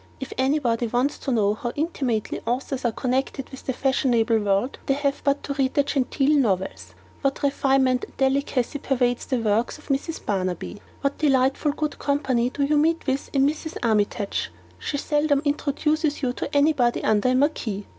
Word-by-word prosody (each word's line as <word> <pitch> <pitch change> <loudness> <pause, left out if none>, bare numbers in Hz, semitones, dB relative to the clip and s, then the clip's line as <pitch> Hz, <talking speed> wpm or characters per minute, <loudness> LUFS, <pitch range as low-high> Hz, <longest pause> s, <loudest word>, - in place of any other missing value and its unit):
If 265 - -6
anybody 260 -4 +1
wants 245 +5 0
to 275 - -3
know 210 -4 +2
how 240 +2 -4
intimately 270 -8 -2
authors 255 +2 -2
are 235 - +3
connected 260 +3 -2
with 265 - -11
the - - +2
fashionable 240 -4 +2
world, 205 +5 0
they 275 - +3
have 280 0 -1
but 280 0 +1
to 280 - -3
read 270 -1 0
the 285 - +4
genteel 280 +1 +1
novels. 190 -7 -1 0.3
What 275 0 -1
refinement 270 -2 +2
and - - -22
delicacy 270 0 0
pervades 245 -3 0
the 260 - 0
works 225 +3 0
of 300 - -18
Mrs. 285 +4 -2
Barnaby! 185 -1 -2 0.2
What 280 0 -1
delightful 270 0 +2
good 300 0 -3
company 265 -4 +1
do 280 +2 -2
you 295 +2 +2
meet 325 +2 +2
with 270 0 -1
in 275 -1 +3
Mrs. 310 +2 -2
Armytage! 210 -2 0 0.3
She 285 - -3
seldom 295 0 +1
introduces 300 +1 0
you 245 -1 +1
to 280 - -5
anybody 285 -5 +2
under 220 +3 +2
a 255 - +2
marquis! 245 -8 0
270 Hz, 175 wpm, -24 LUFS, 240-285 Hz, 0.3 s, the